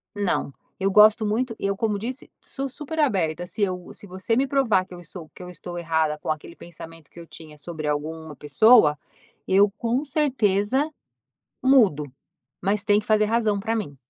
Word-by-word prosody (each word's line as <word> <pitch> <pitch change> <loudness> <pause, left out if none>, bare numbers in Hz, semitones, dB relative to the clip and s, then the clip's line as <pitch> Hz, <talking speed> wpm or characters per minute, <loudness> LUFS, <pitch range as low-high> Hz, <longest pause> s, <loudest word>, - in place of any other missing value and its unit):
não 200 -7 -1 0.3
eu 195 0 +1
gosto 215 +2 +6
muito 225 +3 -1
eu 200 0 -1
como 215 -2 0
disse 250 +5 -6
sou 275 0 -5
super 300 +4 -7
aberta. 175 - 0
Se 215 - -6
eu 180 -2 -3
se - - -11
você 190 +5 -2
me 265 - +2
provar 245 -9 +2
que 185 - -14
eu 175 - -11
estou 170 -2 -11
que - - -12
eu 180 - -9
estou 175 +1 -8
errada 160 -2 0
com - - -7
aquele 155 +2 -6
pensamento 165 -2 -12
que - - -13
eu 170 - -11
tinha 155 -2 -12
sobre 155 0 -6
alguma 155 +1 -4
pessoa, 150 - +5 0.5
eu 195 +2 +4
com 240 +4 -1
certeza 265 -2 +1 0.7
mudo, 225 - +4 0.6
mas 200 0 0
tem 205 -1 +3
que 210 - -16
fazer 215 -1 +3
razão 220 -2 +1
pra 225 +2 -2
mim. 145 -11 -5
200 Hz, 185 wpm, -24 LUFS, 165-225 Hz, 0.7 s, gosto